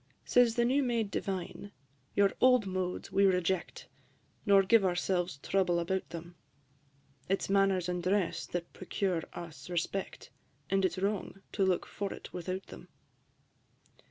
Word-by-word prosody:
IV. - - -20
Says 245 -2 +5
the 240 -1 +3
new 265 +4 +3
made 230 -5 0
Divine, 190 +1 -4 0.4
"Your 200 -1 +4
old 250 -4 +6
modes 185 0 -3
we 195 +1 +3
reject, 180 -1 0 0.6
Nor 200 -1 +7
give 220 +2 +5
ourselves 180 -2 0
trouble 185 -3 +2
about 185 +2 -1
them: 170 +1 -8 1.0
It 195 - +1
is - - -3
manners 195 -3 +3
and 180 0 -1
dress 180 -3 0
that 175 -1 -5
procure 185 -2 -1
us 160 -4 -9
respect, 180 +2 -3 0.4
And 195 0 +3
it 185 -2 +2
's - - -8
wrong 195 0 -2
to 200 - 0
look 185 -2 +2
for 200 -1 -4
it - - -11
without 185 +2 -4
them." - - -12
190 Hz, 155 wpm, -31 LUFS, 175-200 Hz, 1.0 s, Nor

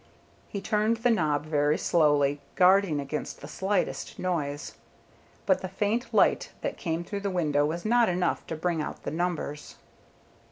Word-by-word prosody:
He 200 - -5
turned 215 +3 +1
the 235 +2 +2
knob 155 -8 +1
very 150 -1 +2
slowly, 145 -3 +2
guarding 185 -4 +4
against 140 +2 -4
the 145 - -9
slightest 190 +6 -2
noise, 150 -5 -2 0.7
but 190 - +3
the 185 - -4
faint 210 +6 -1
light - - +3
that - - -2
came 165 -1 -3
through 200 +3 -4
the 200 0 -2
window 150 -5 +1
was 170 +5 -4
not 235 0 +4
enough 180 -1 -1
to 160 - -3
bring 165 0 -1
out - - -6
the - - -3
numbers. 165 -3 -3
175 Hz, 160 wpm, -27 LUFS, 150-195 Hz, 0.7 s, guarding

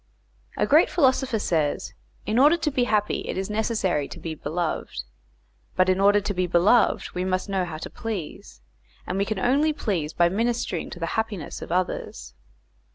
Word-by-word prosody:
A - - +2
great 310 +4 +5
philosopher 260 -6 +2
says, 160 -8 -1 0.3
in 220 +3 +1
order 295 +5 +6
to 305 -2 -1
be 250 -2 +1
happy 210 -3 +1
it - - -3
is 190 +2 -3
necessary 210 -9 0
to - - -10
be 165 - -5
beloved, 160 - -3 0.7
but 185 0 +3
in 185 0 +2
order 205 +1 +5
to 205 0 -3
be 180 -1 0
beloved 180 +7 +3
we 180 - -2
must 185 +2 -1
know 190 -2 0
how 160 -3 -6
to 155 - -7
please, 160 - -6 0.4
and 185 +2 -2
we 200 - +2
can 215 0 -3
only 285 +9 +2
please 180 - -2
by 170 +2 +3
ministering 225 -2 -1
to - - -9
the 165 - -1
happiness 220 -7 -3
of - - -7
others. 180 +1 -2
195 Hz, 180 wpm, -25 LUFS, 175-230 Hz, 0.7 s, order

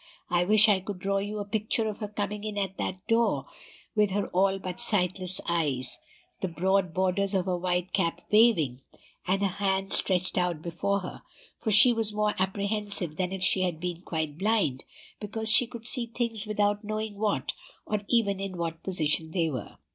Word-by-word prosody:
I 175 0 +3
wish 215 +3 +6
I 205 -3 +4
could 195 +1 -6
draw 195 +2 0
you 205 +2 -4
a 205 - -3
picture 220 +2 0
of 210 - -5
her 210 - -3
coming 210 0 -4
in 215 -1 -4
at 195 -1 -2
that 185 +2 -4
door, 225 - +2 0.5
with 210 -1 +3
her 200 +1 -1
all 190 +1 +2
but 185 -1 -6
sightless 185 -4 +2
eyes, 145 -7 0 0.4
the 190 - -1
broad 185 +1 +1
borders 190 +2 0
of 185 -2 +1
her 185 -1 0
white 180 0 -1
cap 170 -3 +1
waving, 210 - +4 0.5
and 195 +2 +1
her - - +4 0.2
hands 195 0 +3
stretched 185 0 +2
out 175 -3 -1
before 200 +4 -1
her; 180 - -8 0.3
for 220 - -4
she 240 +4 +7
was 220 -2 -1
more 210 0 +1
apprehensive 200 -3 -1
than 185 -1 -1
if 190 -1 -4
she 185 - +2
had 175 -4 -1
been 175 0 -4
quite 160 -3 -3
blind, 195 - +1 0.3
because 220 +2 -3
she 240 +1 +5
could 235 -2 -10
see 240 0 0
things 230 -2 -3
without 205 0 0
knowing 215 -1 -4
what, 215 -1 0 0.3
or 210 -1 -1
even 205 -5 +2
in 195 -2 -4
what 165 -1 -4
position 160 -3 0
they 165 -1 0
were. 125 -6 -6
195 Hz, 190 wpm, -28 LUFS, 180-210 Hz, 0.5 s, she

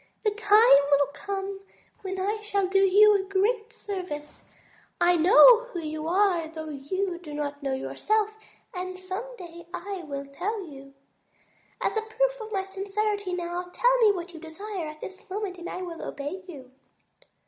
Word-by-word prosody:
The 425 - +2
time 420 -6 +6
will 285 0 +5
come 395 +1 -4 0.4
when 380 -1 -4
I 415 +3 -1
shall 400 -2 0
do 385 +1 +2
you 405 +2 +6
a 400 - +3
great 420 +4 0
service. 360 -10 -7 0.5
I 350 0 +4
know 465 +8 +8
who 435 -8 -6
you 310 -1 -4
are 360 -2 +2
though 315 -1 -7
you 345 +6 -3
do 305 -4 -9
not 290 -1 -4
know 270 -1 -1
yourself 430 +9 -1 0.4
and 370 0 -5
some 390 +7 -6
day 340 -1 -11
I 390 0 -5
will 280 -2 -5
tell 375 +9 -4
you. 275 -3 -12 0.9
As - - 0
a - - +2
proof - - -1
of 435 0 -8
my 390 -2 0
sincerity 400 0 -2
now, 350 0 -4
tell - - +3
me 440 -3 +6
what 355 -2 -5
you 325 - -9
desire 350 +2 -6
at 305 0 -10
this 380 +2 -9
moment 380 -2 -4
and 345 - -6
I 370 - -5
will 340 -2 -7
obey 290 +7 -5
you." 265 -7 -11
375 Hz, 170 wpm, -27 LUFS, 325-415 Hz, 0.9 s, know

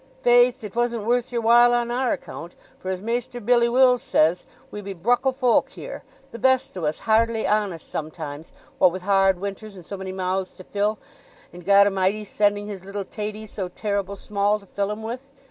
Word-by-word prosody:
"Faith, 245 +1 +4
it 210 -1 -8
wasn't 235 -2 0
worth 245 +2 +1
your 235 -1 -1
while 240 +1 +6
on 240 0 0
our 250 0 0
account, 170 +2 -8 0.2
for 185 - -6
as 185 0 -3
Maister 240 +2 -3
Billy 235 +1 +3
Wills 250 0 +4
says, 165 +3 +2 0.3
we 210 - -6
be 200 -1 -6
bruckle 245 +9 +2
folk 255 -2 +2
here—the 270 - -11
best 260 +1 +2
o' 175 -4 -3
us 150 +1 -1
hardly 225 0 +2
honest 205 -6 -1
sometimes, 155 -1 -6 0.3
what 185 - +6
with 185 +1 -7
hard 195 -1 +3
winters, 200 +2 -6
and 180 -3 -12
so 200 - -6
many 190 0 -6
mouths 185 0 -2
to 185 - -12
fill, 205 +3 -1 0.6
and 175 0 -11
Goda'mighty 200 +1 +4
sending 205 0 0
his 200 -3 -7
little 200 0 -5
taties 215 +1 -6
so 190 -3 -4
terrible 200 +1 -3
small 205 +1 0
to 200 - -17
fill 200 +1 -2
'em 210 +1 -5
with. 250 +5 -6
210 Hz, 190 wpm, -23 LUFS, 190-240 Hz, 0.6 s, while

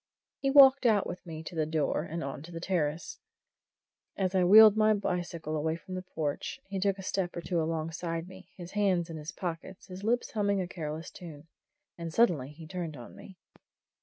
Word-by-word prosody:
He 275 - 0
walked 270 -2 +7
out 210 -3 +3
with 180 - -6
me 160 -1 -7
to 160 - -8
the 155 -2 -1
door, 155 -2 0
and 165 +1 -5
on 140 0 -5
to 165 +3 -11
the 165 - -6
terrace. 165 -3 -2 1.0
And 195 - 0
as 185 - -1
I 185 -1 +3
wheeled 215 +3 +9
my 215 0 +4
bicycle 175 -5 -3
away 160 +1 0
from 175 +2 -10
the 185 - -3
porch, 160 - -4
he 195 -8 -4
took 195 0 +1
a 190 - -8
step 185 -1 -2
or - - -3
two 170 -1 -1
alongside 165 +1 -3
me, 185 0 -13
his 175 -1 -9
hands 185 -5 +1
in 160 - -6
his 155 +1 -6
pockets, 180 +1 -6
his 185 +1 -9
lips 240 +3 0
humming 200 -2 +1
a 185 - -2
careless 160 -2 -6
tune. 160 -4 -11 0.5
And 165 -1 -5
suddenly 160 - +2
he 155 +2 -12
turned 165 -2 -5
on 120 - -11
me. 190 -3 -13
175 Hz, 205 wpm, -30 LUFS, 160-195 Hz, 1.0 s, wheeled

